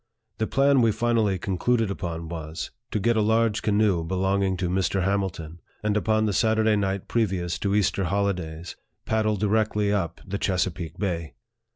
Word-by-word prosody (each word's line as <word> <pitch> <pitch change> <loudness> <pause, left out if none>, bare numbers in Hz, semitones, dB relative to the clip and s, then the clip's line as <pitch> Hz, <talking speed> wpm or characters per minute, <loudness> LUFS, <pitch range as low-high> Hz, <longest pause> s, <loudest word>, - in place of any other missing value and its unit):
The 110 - 0
plan 135 0 +3
we 115 -2 +4
finally 110 -3 +1
concluded 100 +4 0
upon 85 -4 -4
was, 80 -1 -6 0.2
to 110 - -1
get 115 +4 +2
a 110 - +3
large 110 0 +2
canoe 105 -5 +2
belonging 95 +2 0
to 90 0 -1
Mr. 95 +1 0
Hamilton, 90 -4 -2 0.2
and 105 -1 +1
upon 110 +1 +2
the 105 - 0
Saturday 110 +1 +3
night 95 -2 -1
previous 95 -7 -1
to 100 0 0
Easter 100 -2 +1
holidays, 90 -3 -2 0.3
paddle 110 -1 +1
di 105 - -1
rectly 105 -1 +1
up 85 -5 -2
the 100 +1 -4
Chesapeake 90 -3 -1
Bay. 85 -5 -3
100 Hz, 165 wpm, -25 LUFS, 90-110 Hz, 0.3 s, we